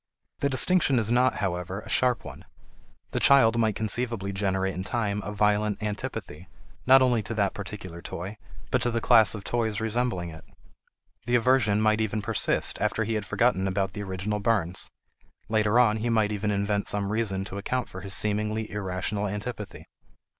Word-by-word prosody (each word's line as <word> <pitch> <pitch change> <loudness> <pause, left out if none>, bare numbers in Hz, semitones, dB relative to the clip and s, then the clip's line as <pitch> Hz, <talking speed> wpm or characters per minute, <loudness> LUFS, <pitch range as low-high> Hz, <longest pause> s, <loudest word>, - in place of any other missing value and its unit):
The 140 - +1
distinction 140 +1 +4
is 110 -1 0
not, 125 +2 +3
however, 90 +1 -3
a - - -14
sharp 125 -1 +1
one. - - -9 0.7
The - - -1
child 115 -4 +5
might 110 -3 +1
conceivably 110 -2 0
generate 95 -1 -1
in 95 - -4
time 105 -1 -1
a 105 - -5
violent 105 0 +1
antipathy, 95 -5 -5 0.4
not 135 0 +7
only 120 -3 +2
to 110 +2 -5
that 100 -2 +1
particular 95 -4 -7
toy, 95 +6 -7 0.3
but - - +2
to 120 - +1
the 115 0 -1
class 115 -2 +5
of 105 - -7
toys 110 -3 -1
resembling 110 -5 -1
it. 80 -1 -11 0.8
The 120 - +2
aversion 120 -4 +3
might 110 0 +2
even 110 -1 -2
persist - - 0
after 115 - 0
he 115 +1 -2
had 105 -3 -3
forgotten 95 -3 +1
about 95 0 -1
the 105 - -5
original 100 +2 -3
burns; 95 -5 +1 0.6
later 110 0 +2
on 115 -3 +4
he 115 +2 -2
might 110 -2 +2
even 105 0 -2
invent 100 0 -1
some 100 -1 -1
reason 100 -4 -1
to 100 0 -6
account 125 +4 -2
for 95 - -9
his 100 +1 -1
seemingly 105 +1 -1
irrational 100 +1 -3
antipathy. 105 +1 -6
105 Hz, 175 wpm, -26 LUFS, 100-115 Hz, 0.8 s, not